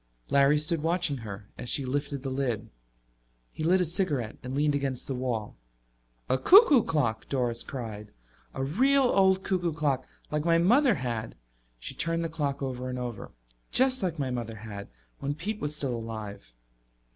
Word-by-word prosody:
Larry 140 +1 +5
stood 155 +1 -1
watching 165 -2 0
her 105 -3 -8
as 120 - -5
she 135 +2 +1
lifted 140 +1 -2
the 135 - -3
lid. 130 -5 -2 0.8
He 155 - -5
lit 180 +3 +4
a - - +2
cigarette 150 - 0
and 130 +1 -5
leaned 145 +1 +2
against 135 -3 -2
the 135 - -3
wall. 125 -4 -3 0.7
"A 130 - +1
cuckoo 360 - +8
clock!" 115 - -1
Doris 120 -4 0
cried. 110 -5 -5 0.5
"A 135 - -2
real 265 - +3
old 190 -5 +4
cuckoo 175 -3 0
clock 145 -4 0 0.2
like 150 0 0
my 165 0 +4
mother 240 - +4
had." 120 -5 -4 0.4
She - - -6
turned 165 +1 -1
the 165 - -2
clock 145 -3 -2
over 130 -1 -3
and 125 - -4
over. 125 -3 -5 0.4
"Just 260 0 +4
like 175 -4 -1
my 135 -3 -2
mother 115 -2 -4
had, 105 -2 -8 0.3
when 140 +1 -2
Pete 215 +7 -4
was 150 0 -2
still 140 -4 -2
alive." 110 - -7
140 Hz, 170 wpm, -28 LUFS, 120-165 Hz, 0.8 s, cuckoo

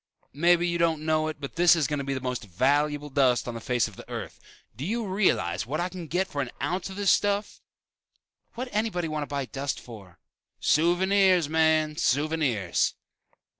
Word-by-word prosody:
"Maybe 175 +4 +3
you 170 0 -1
don't 165 -2 +1
know 155 0 +1
it 155 - -4
but 140 +1 -8
this 175 0 +6
is 160 -3 +1
going 145 +2 -2
to - - -3
be 135 0 -2
the - - -2
most 125 -3 -4
valuable 145 - 0
dust 130 -3 +2
on 120 - -3
the 115 - -6
face 125 -2 +1
of - - -13
the - - -12
Earth! - - -6 0.4
Do 125 - -7
you 225 +7 -2
realize 185 - 0
what 150 +4 -2
I 175 +1 -1
can 175 -2 -8
get 180 +4 0
for 145 -6 -3
an 130 - -3
ounce 180 +2 -2
of 190 - -8
this 200 -2 +2
stuff?" 205 0 0 0.9
"What's 250 +1 -5
anybody 210 -6 0
want 155 -1 -3
to 145 - -4
buy 140 -2 -3
dust 140 +1 -4
for?" 100 -7 -13 0.4
"Souvenirs, 180 +1 +3
man, 155 -1 +2
souvenirs!" 140 - +1
155 Hz, 195 wpm, -26 LUFS, 135-175 Hz, 0.9 s, this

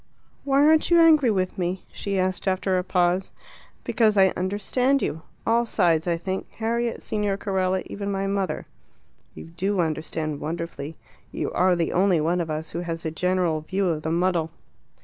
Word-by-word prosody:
"Why 280 +1 +4
aren't 315 0 +4
you 340 -1 +6
angry 310 -6 +6
with 185 -3 -1
me?" 180 +1 -2
she 200 -1 -3
asked, 185 0 -1
after 190 0 +1
a 180 - +1
pause. 180 0 +1 0.5
"Because 215 -3 +2
I 190 -1 +5
understand 210 +8 0
you 160 - -2 0.2
all 230 +1 +3
sides, 175 -8 +1
I 170 -1 +1
think, 185 +3 -4
Harriet, 230 +1 -2
Signor 205 -2 -1
Carella, 190 -1 0
even 200 0 -4
my 195 0 -1
mother." 195 -5 -2 0.7
"You 165 - -10
do 190 +2 -1
understand 155 -2 -2
wonderfully. 165 -1 -5 0.3
You - - -3
are 180 0 +3
the 170 -2 -1
only 185 -2 +3
one 170 +3 +1
of 165 - -4
us 155 0 -4
who 170 - -4
has 165 -1 -5
a 160 - -1
general 180 -2 0
view 190 +4 -1
of 155 -2 -1
the 160 - -3
muddle." 170 -1 +1
185 Hz, 175 wpm, -24 LUFS, 165-200 Hz, 0.7 s, you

